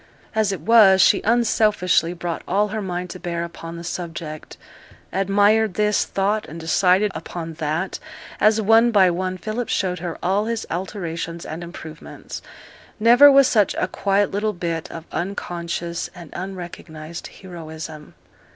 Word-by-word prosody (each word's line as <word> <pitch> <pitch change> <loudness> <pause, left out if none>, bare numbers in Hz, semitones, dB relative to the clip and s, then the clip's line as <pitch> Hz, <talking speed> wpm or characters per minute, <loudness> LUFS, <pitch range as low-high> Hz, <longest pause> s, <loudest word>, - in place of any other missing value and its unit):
As 215 -2 +1
it 190 -6 -4
was, 200 -1 +6
she 195 - +5
unselfishly 215 -7 +2
brought 170 -1 -4
all 205 +3 +1
her 215 +1 -3
mind 180 -2 -4
to 185 - -8
bear 170 -1 -3
upon 170 0 -8
the 170 - -8
subject; 170 -3 -6 0.6
admired 205 +2 +3
this, 210 0 +2
thought 205 +2 -1
and 165 +2 -8
decided 185 +5 +3
upon 165 0 -6
that, 160 +5 -2 0.4
as 215 +1 +4
one 225 +3 +5
by 195 -5 +5
one 185 +1 -2
Philip 220 +6 -4
showed 180 -2 0
her 170 -1 -5
all 195 +4 +1
his 230 0 -2
alterations 170 -2 -4
and 160 +2 -6
improvements. 160 -2 -9 0.6
Never 245 +6 +8
was 275 -1 +6
such 210 -4 +2
a - - 0
quiet 200 +1 +1
little 210 +2 -1
bit 170 -3 -3
of 165 -1 -8
unconscious 170 -2 -4
and 170 -4 -11
unrecognized 175 -3 -7
heroism. 160 -4 -9
185 Hz, 145 wpm, -22 LUFS, 170-210 Hz, 0.6 s, Never